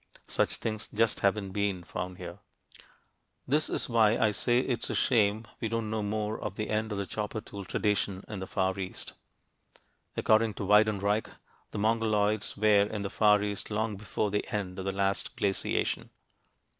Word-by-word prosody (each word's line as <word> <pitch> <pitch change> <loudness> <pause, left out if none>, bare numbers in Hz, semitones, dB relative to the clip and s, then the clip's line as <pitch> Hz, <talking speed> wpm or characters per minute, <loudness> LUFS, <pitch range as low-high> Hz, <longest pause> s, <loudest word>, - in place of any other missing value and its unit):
Such - - +1
things 110 -2 -3
just 110 +1 +1
haven't 100 -1 +1
been 100 -2 -1
found 90 0 -5
here. - - -8 1.1
This 150 +4 +2
is - - 0
why 115 -2 +4
I 110 - +3
say 120 +3 +2
it's 125 -3 -1
a - - -1
shame 110 -2 +2
we 115 - -2
don't 115 -1 -2
know 110 -1 -1
more 105 +1 -2
of 100 -2 -4
the 110 - -3
end 110 +1 0
of 105 - -2
the 100 - -1
chopper 105 +3 -3
tool 100 -2 -8
tradition 100 -1 0
in 105 -3 -5
the 95 - -5
Far 95 0 0
East. 95 -1 -5 1.0
According 110 -1 +3
to 100 - -4
Weidenreich, 105 +1 +3 0.4
the - - -6
Mongoloids 110 -1 +1
were 105 -1 +5
in 105 -2 -3
the 100 - -4
Far 105 -1 +4
East 100 -1 -3
long 110 0 -1
before 100 +1 -2
the 105 - -1
end 100 -4 -3
of 95 - -4
the 95 - 0
last 100 0 -1
glaciation. 100 -1 -1
105 Hz, 175 wpm, -29 LUFS, 100-110 Hz, 1.1 s, were